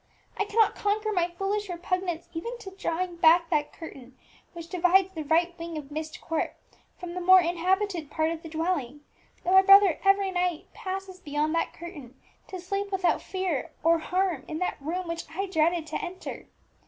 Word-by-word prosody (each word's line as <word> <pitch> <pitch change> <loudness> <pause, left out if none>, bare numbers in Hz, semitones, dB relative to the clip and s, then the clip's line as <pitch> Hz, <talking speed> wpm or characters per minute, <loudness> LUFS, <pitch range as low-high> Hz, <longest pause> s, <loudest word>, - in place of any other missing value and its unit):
I 410 - 0
cannot 430 0 +3
conquer 425 +1 0
my 350 -4 +1
foolish 390 +3 -2
repugnance 355 -1 -2
even 465 +9 -4
to 395 -5 -9
drawing 360 -2 -3
back 335 +1 +5
that 295 -2 +1
curtain 265 -5 -11 0.4
which 335 -1 -8
divides 365 +2 +3
the 315 -3 -4
right 335 +3 +2
wing 335 -1 -5
of 295 -1 -8
Myst 310 +1 -5
Court 325 -1 -2 0.4
from 355 -1 -7
the 365 - -4
more 370 +1 +8
inhabited 350 -1 0
part 315 +1 0
of 330 -1 -5
the 325 - -9
dwelling, 315 -4 -2 0.4
though 360 - 0
my 380 0 +8
brother 390 -3 +7
every 390 0 +3
night 355 -3 -2
passes 380 0 -6
beyond 300 -2 -1
that 330 - 0
curtain 295 -8 -10 0.3
to 375 - -7
sleep 395 +3 -3
without 380 -2 +1
fear 345 -5 -3
or 330 +1 +4
harm 360 -4 -1
in 310 - -4
that 360 -4 -2
room 345 +5 -3
which 335 0 -4
I 390 +3 -1
dreaded 335 -2 +1
to 310 - -4
enter. 365 +1 -7
350 Hz, 180 wpm, -27 LUFS, 320-380 Hz, 0.4 s, more